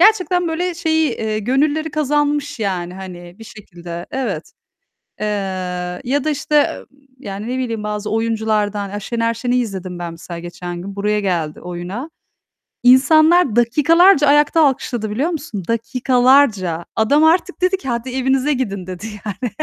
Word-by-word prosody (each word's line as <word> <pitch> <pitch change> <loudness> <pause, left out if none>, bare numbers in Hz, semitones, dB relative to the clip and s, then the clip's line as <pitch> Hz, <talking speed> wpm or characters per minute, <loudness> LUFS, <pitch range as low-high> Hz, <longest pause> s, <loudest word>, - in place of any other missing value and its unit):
gerçekten, 365 -3 +4
böyle, 350 +2 -2
şeyi, 320 -3 +1
eee, 215 -1 -2
gönülleri 290 +7 0
kazanmış 295 -1 0
yani, 180 -3 -2
hani, 180 -2 -9
bir 225 - -11
şekilde, 175 -5 -9
evet. 220 -12 -4 0.7
Eee, 215 - -1 0.8
ya 275 +3 0
da, 310 - +1
işte, 295 0 +1
ım - - -16 0.3
yani, 205 -2 -6
ne 255 - -2
bileyim, 230 -4 -3
bazı 210 0 -3
oyunculardan, 215 -3 -1
ya 205 - -5
Şener 230 +2 -1
Şen'i 245 +2 -1
izledim 190 -7 -3
ben 170 -1 -5
mesela 170 +1 -8
geçen 175 0 -7
gün, 195 +1 -8
buraya 210 +1 0
geldi 170 -6 -2
oyuna. 180 - -6 0.7
İnsanlar 310 +3 +5
dakikalarca 295 +7 +5
ayakta 295 +3 +4
alkışladı 245 -6 0
biliyor 275 +11 0
musun? 280 - -5
Dakikalarca. 230 - +2
Adam 285 +8 +3
artık 355 +3 +2
dedi 370 +1 +2
ki 370 - -10
"Hadi, 235 +1 -2
evinize 265 +2 +1
gidin." 200 -8 -3
dedi 185 +4 -6 0.2
yani. 215 +3 -4
235 Hz, 145 wpm, -19 LUFS, 200-290 Hz, 0.8 s, İnsanlar